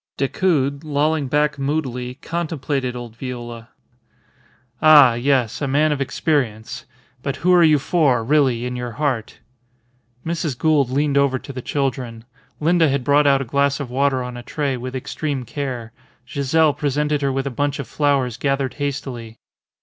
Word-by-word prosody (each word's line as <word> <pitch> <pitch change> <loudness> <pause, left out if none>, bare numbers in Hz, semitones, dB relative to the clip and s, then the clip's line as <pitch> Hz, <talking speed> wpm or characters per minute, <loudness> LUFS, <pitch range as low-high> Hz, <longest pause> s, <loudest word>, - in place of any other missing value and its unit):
Decoud, 140 -1 0
lolling 150 0 0
back 150 +1 +1
moodily, 130 -4 -2
contemplated 145 -5 -3
old 120 -2 -8
Viola. 120 -2 -7 1.1
"Ah! 150 -5 +8
Yes. 125 -1 0
A 140 - 0
man 150 +3 +2
of 145 -2 -1
experience. 125 -5 -2 0.4
But 140 0 -3
who 180 +4 +2
are 175 - +6
you 155 -2 +5
for, 135 -5 +2
really, 130 -3 +2
in 125 0 -3
your 120 -1 -5
heart?" 130 -4 -2 0.9
Mrs. 160 -5 -2
Gould 150 -4 +2
leaned 140 +1 +1
over 140 -2 +2
to 140 - -9
the 130 - -5
children. 125 -5 -3 0.3
Linda 165 0 +3
had 135 -1 0
brought 145 +2 +4
out 135 -1 +4
a - - -10
glass 140 +3 +1
of 135 -4 -5
water 135 0 +1
on 125 0 -6
a - - -7
tray, 140 +2 -2
with 125 +1 -6
extreme 135 0 -3
care; 125 -5 -5 0.3
Giselle 145 +3 +2
presented 150 +1 -1
her 140 -1 +1
with 135 +1 -2
a 140 - -2
bunch 145 +3 -1
of 140 - -5
flowers 140 -5 0
gathered 135 -1 -1
hastily. 125 -5 -4
140 Hz, 160 wpm, -21 LUFS, 125-150 Hz, 1.1 s, Ah